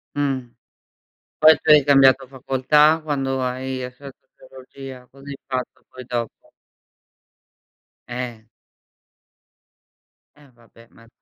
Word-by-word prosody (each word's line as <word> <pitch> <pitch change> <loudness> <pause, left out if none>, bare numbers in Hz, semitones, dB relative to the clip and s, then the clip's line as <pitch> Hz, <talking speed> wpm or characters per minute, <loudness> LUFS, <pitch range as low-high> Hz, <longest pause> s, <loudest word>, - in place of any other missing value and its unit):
Mh. 140 -2 -1 1.0
Poi 155 +1 +8
tu - - -13
hai 150 -1 +8
cambiato 135 -2 +5
facoltà 140 +4 +2
quando 135 -3 -2
hai 130 +1 -4
hai 125 - -6
studiato 135 +1 -15
teologia? 130 -1 -13
Cosa 135 +1 -17
hai 140 -1 -7
fatto 130 -2 -5
poi 130 0 -11
dopo? 120 -2 -6 1.6
Eh. 120 -3 -7 1.9
Eh, 145 -2 -21
vabbè 115 0 -21
ma 115 0 -20
130 Hz, 105 wpm, -21 LUFS, 125-140 Hz, 1.9 s, Poi